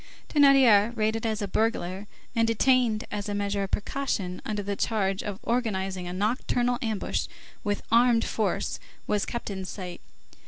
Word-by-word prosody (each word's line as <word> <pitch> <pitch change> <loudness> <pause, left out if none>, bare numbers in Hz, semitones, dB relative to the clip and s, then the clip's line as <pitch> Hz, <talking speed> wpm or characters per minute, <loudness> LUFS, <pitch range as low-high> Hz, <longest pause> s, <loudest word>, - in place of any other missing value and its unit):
Thénardier, 255 -7 +5
rated 220 +1 0
as 215 -1 -1
a - - -2
burglar, 200 -2 -1 0.3
and 230 0 +3
detained 230 -1 +3
as 205 0 -3
a 205 - -2
measure 200 0 -1
of 195 - -2
precaution 205 -6 -2
under 210 -1 -3
the 200 0 -2
charge 195 -3 0
of 205 -2 -5
organizing 195 -6 -1
a - - -4
nocturnal 240 +5 0
ambush, 220 -5 -1 0.4
with 205 -2 -1
armed 235 0 +5
force, 215 -3 -1 0.3
was 210 -1 0
kept 235 -3 -4
in 190 -1 -4
sight. 185 -1 -7
215 Hz, 155 wpm, -27 LUFS, 195-235 Hz, 0.4 s, Thénardier